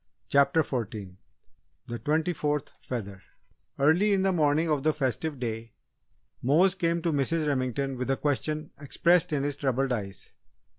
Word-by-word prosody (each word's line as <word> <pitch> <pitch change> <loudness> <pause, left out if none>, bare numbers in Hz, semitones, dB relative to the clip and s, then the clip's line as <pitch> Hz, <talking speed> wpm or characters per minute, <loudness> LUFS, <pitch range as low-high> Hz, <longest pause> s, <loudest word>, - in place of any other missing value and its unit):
CHAPTER 140 +3 +4
FOURTEEN 105 -8 -5 0.7
THE 120 -2 -5
TWENTY 160 +3 0
FOURTH 150 -2 -2
FEATHER 100 -6 -5 0.6
Early 175 +9 +4
in 190 -1 +2
the 195 - +3
morning 155 -1 +2
of 150 -3 +1
the 155 +2 +2
festive 140 +1 -2
day, 115 -2 -4 0.7
Mose 165 +9 +4
came 170 -3 -1
to 170 - +1
Mrs. 155 +3 +1
Remington 135 -1 -1
with 125 +1 -3
a 135 - +2
question 150 +2 -2
expressed 170 +4 +2
in 145 -2 0
his 145 0 -2
troubled 135 -1 0
eyes. 100 -4 -5
145 Hz, 150 wpm, -28 LUFS, 125-160 Hz, 0.7 s, CHAPTER